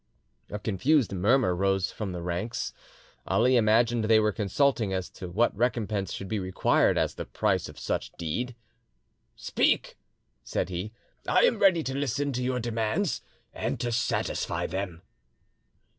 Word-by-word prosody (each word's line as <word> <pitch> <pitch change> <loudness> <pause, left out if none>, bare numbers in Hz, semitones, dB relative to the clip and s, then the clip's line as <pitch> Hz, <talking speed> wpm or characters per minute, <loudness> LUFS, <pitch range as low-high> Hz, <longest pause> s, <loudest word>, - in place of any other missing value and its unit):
A 105 - -4
confused 115 - +1
murmur 100 +1 +3
rose 95 0 +1
from 105 -4 -4
the 90 -1 -5
ranks. 90 +7 -3 0.5
Ali 125 +3 +3
imagined 115 0 +3
they 110 0 +5
were 105 0 +2
consulting 110 +1 +1
as 95 -1 -3
to 90 - -8
what 115 +7 +1
recompense 105 -4 -1
should 95 - -5
be 110 +1 -1
required 95 -1 +2
as - - +1
the - - -6
price - - 0
of - - -13
such - - -3
deed. 120 +10 -3 0.8
"Speak," - - 0 0.4
said - - -2
he; 90 +4 -4 0.4
"I - - +4
am - - +3
ready 185 -5 +5
to 135 - -3
listen 140 +1 -1
to 125 0 -2
your 125 0 0
demands 115 - -1 0.3
and - - -3
to 120 - -1
satisfy 120 +1 -1
them." 90 -2 -4
110 Hz, 150 wpm, -28 LUFS, 95-125 Hz, 0.8 s, they